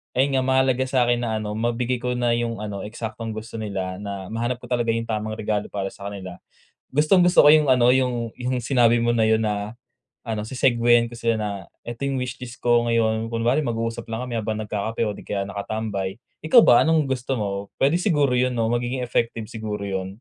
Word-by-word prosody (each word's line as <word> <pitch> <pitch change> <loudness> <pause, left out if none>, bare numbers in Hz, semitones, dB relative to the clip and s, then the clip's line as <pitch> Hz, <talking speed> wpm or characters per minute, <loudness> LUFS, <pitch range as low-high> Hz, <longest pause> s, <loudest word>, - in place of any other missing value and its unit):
ayun 135 +2 +2
nga, - - 0
mahalaga 130 0 +2
sa'kin 120 -2 +2
na 115 -2 -2
ano, 105 - -4
mabigay 120 +1 -1
ko 125 0 -2
na 120 -1 +1
'yong 115 -2 -1
ano 105 -2 -5
eksaktong 110 0 -6
gusto 110 +1 -7
nila 95 -3 -4
na 100 -1 -6
mahanap 120 +2 -3
ko - - -7
talaga 120 -1 0
'yong 115 - -1
tamang 110 -1 -3
regalo 105 -1 -2
para 95 -1 -4
sa 100 - -9
kanila. 95 -3 -8 0.5
Gustong-gusto 175 +5 +5
ko - - +7
'yong 150 -3 +6
ano, 125 -1 +4
'yong 125 -3 +1
'yong 125 0 -2
sinabi 120 -1 +3
mo 120 0 +1
na 110 - +3
'yon 110 0 +3
na, 105 -1 -2 0.5
ano, 110 -2 -4
se-segueyan 120 -2 +3
ko - - -8
sila 115 -1 +1
na, 105 -1 -2 0.3
"Eto, 120 +4 -4
yung 135 - -1
wishlist 125 -1 -7
ko 120 -1 +3
ngayon," 115 -1 +1
kunwari 115 +5 +1
mag-uusap 115 -4 -3
lang 115 +2 -4
kami 120 -2 -3
habang 110 0 -3
nagkakape 105 +2 -2
o 105 - 0
'di - - -11
kaya 100 -1 -1
nakatambay. 100 -1 -4 0.2
"Ikaw 165 +10 +6
ba, 120 - +7
anong 160 -1 +3
gusto 130 +1 -2
mo?" 100 -3 -3
Pwede 150 +6 +2
siguro 145 -9 +2
'yon 125 0 +1
'no? 115 0 0
Magiging 120 +2 -1
effective 115 -2 -1
siguro 105 -2 -5
'yon? 95 -1 -3
115 Hz, 200 wpm, -23 LUFS, 110-125 Hz, 0.5 s, ko